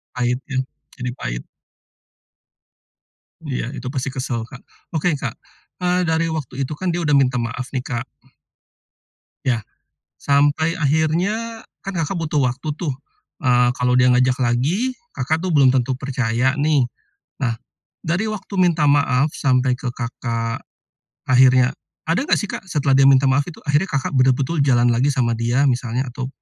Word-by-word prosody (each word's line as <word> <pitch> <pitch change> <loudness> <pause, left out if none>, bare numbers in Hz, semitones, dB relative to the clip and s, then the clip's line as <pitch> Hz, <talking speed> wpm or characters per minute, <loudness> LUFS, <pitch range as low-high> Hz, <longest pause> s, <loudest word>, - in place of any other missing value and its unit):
Pahit 125 0 0
ya, 130 - 0 0.4
ini 125 0 -2
pahit. - - -5 2.0
Iya, - - -2
itu 130 - -8
pasti 135 0 -2
kesel 130 -3 -3
Kak. 125 - -11 0.3
Oke 165 +2 +1
Kak, - - -4 0.5
eee, 180 0 +2
dari 160 +1 +2
waktu 140 -3 -4
itu 150 - -5
kan, 185 +5 -3
dia 175 0 -1
udah 150 - +2
minta 130 -3 +3
maaf 120 +2 -3
nih 130 -2 -3
Kak? 120 0 -3 1.4
Iya. 120 -4 +1 0.6
Sampai 145 +4 +2
akhirnya, 175 +10 0 0.2
kan 195 - -4
Kakak 170 +2 -1
butuh 155 -3 0
waktu 130 +5 -5
tuh, 155 -4 -3 0.5
eee, 125 -1 +4
kalau 125 0 +1
dia 125 - +5
ngajak 125 +1 +3
lagi, 150 - 0 0.2
Kakak 160 +6 -1
tuh 185 - -1
belum 140 -4 +5
tentu 130 0 +1
percaya 130 0 0
nih. 145 -4 +2 0.6
Nah, 115 -2 +1 0.5
dari 170 +6 0
waktu 200 -1 -7
minta 170 -5 +3
maaf 140 0 +3
sampai 130 -1 +2
ke 125 -1 -4
Kakak, 115 -1 -3 0.6
akhirnya, 130 0 +5 0.3
ada 165 +6 +2
enggak - - +2
sih 205 - -4
Kak, - - -6
setelah 145 -6 +1
dia 135 - +6
minta 135 0 +5
maaf 140 +2 +3
itu 175 - -10
akhirnya 150 +6 +2
Kakak 135 0 -1
betul-betul 135 +4 +2
jalan 120 -3 +4
lagi 130 +5 +2
sama 120 -4 +1
dia, 120 +5 +2
misalnya, 125 +1 -1
atau, 125 +1 -5
135 Hz, 155 wpm, -21 LUFS, 125-155 Hz, 2.0 s, dia